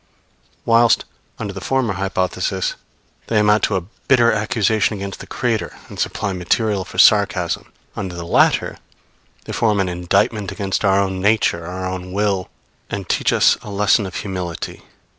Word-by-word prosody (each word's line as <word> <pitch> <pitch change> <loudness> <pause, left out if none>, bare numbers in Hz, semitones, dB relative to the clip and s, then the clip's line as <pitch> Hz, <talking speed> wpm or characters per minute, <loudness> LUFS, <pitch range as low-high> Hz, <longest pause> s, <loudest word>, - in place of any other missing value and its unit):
Whilst, 115 -1 +4 0.3
under 100 -1 -5
the 95 - -7
former 130 -4 0
hypothesis, 95 0 -1 0.5
they 115 - +1
amount 105 0 +4
to 100 - -1
a 95 - 0 0.3
bitter 120 -3 +5
accusation 110 0 +1
against 100 0 -6
the - - -10
Creator, 120 -4 -2
and - - -10
supply 100 - -1
material 95 +3 0
for - - -11
sarcasm; 100 -5 +3 0.2
under 95 -3 -5
the 85 -1 -6
latter - - +2 0.7
they - - -6
form 105 -3 +1
an 95 -2 +1
indictment 90 +3 0
against 100 -1 -2
our 100 -1 +4
own 95 -1 -1
nature, 100 -5 +2
our 90 +1 -5
own 90 0 -5
will, 100 -2 0 0.4
and 100 -2 -4
teach - - +2
us - - +4
a - - -9
lesson 100 0 +2
of 95 - -9
humility. 90 -4 -5
100 Hz, 160 wpm, -20 LUFS, 95-105 Hz, 0.7 s, bitter